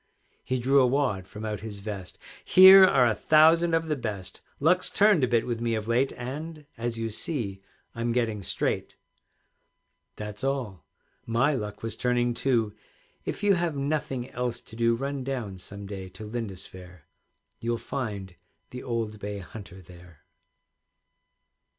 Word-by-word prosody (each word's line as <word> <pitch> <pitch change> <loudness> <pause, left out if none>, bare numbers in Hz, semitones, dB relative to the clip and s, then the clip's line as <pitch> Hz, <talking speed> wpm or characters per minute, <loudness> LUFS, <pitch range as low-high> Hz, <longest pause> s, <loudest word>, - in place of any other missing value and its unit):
He 130 - -1
drew 135 +3 +4
a 130 - +4
wad 125 -9 0
from 105 +2 -8
out 105 -1 -3
his 105 -1 -7
vest, 100 -3 -7 0.3
"Here 190 +1 +9
are 135 -9 +4
a 115 - +3
thousand 165 +5 +5
of 165 0 0
the 155 - 0
best; 100 -7 -6 0.2
Luck's 180 +5 +3
turned 205 -8 +4
a - - +4
bit 120 -2 +2
with 120 -2 -3
me 115 -1 0
of 110 0 -4
late, 125 +4 +2
And, 150 +5 -7
as 115 0 -3
you 115 0 -3
see, 105 - -3 0.3
I'm 115 0 -2
getting 115 -4 0
straight." 90 - -2 1.2
That's 105 +1 -7
all. 125 - -2 0.4
My 120 +6 +2
luck 105 -5 -5
was 115 -1 -3
turning 120 0 +1
too; 115 -4 0 0.5
If - - -4
you 205 -1 +5
have 170 -4 0
nothing 140 -3 -2
else 125 -1 -2
to 110 - -14
do, 115 0 +2
Run 135 +2 -3
down 120 -8 -4
some 100 +2 -8
day 95 -2 -7
to 110 - -8
Lindisfaire, 95 -6 -7 0.6
You'll 120 0 -1
find 105 -8 -5 0.4
the 125 - -7
old 115 -4 -3
bay 100 0 -5
hunter 95 -1 -10
there. 85 -2 -16
115 Hz, 155 wpm, -27 LUFS, 105-135 Hz, 1.2 s, Here